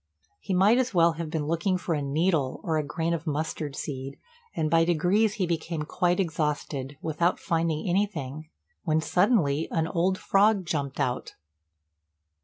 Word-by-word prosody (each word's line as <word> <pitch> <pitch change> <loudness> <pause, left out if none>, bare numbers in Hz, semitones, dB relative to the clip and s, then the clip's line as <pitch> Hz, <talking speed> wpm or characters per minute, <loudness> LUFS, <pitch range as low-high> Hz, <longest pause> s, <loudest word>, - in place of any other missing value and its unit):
He 190 - -2
might 205 +7 +5
as 250 -5 -1
well 170 -1 +5
have 165 -1 -5
been 155 -2 -2
looking 170 +4 0
for 180 -2 -2
a 150 - -1
needle 145 -1 0
or 160 -2 0
a - - -1
grain 165 +3 -2
of 165 0 -4
mustard 150 -1 -3
seed; 135 -2 -5 0.4
and 155 - 0
by 165 +1 +4
degrees 180 +6 +2
he 195 -5 0
became 165 -1 -2
quite 175 +4 0
exhausted, 150 -5 -2
without 165 +2 0
finding 165 -2 -1
anything, 155 -6 -2 0.3
when 160 -2 +2
suddenly 165 - +2
an 160 -1 0
old 185 +3 +1
frog 200 0 +3
jumped 140 -4 -3
out. 125 0 -2
165 Hz, 160 wpm, -27 LUFS, 150-180 Hz, 0.4 s, might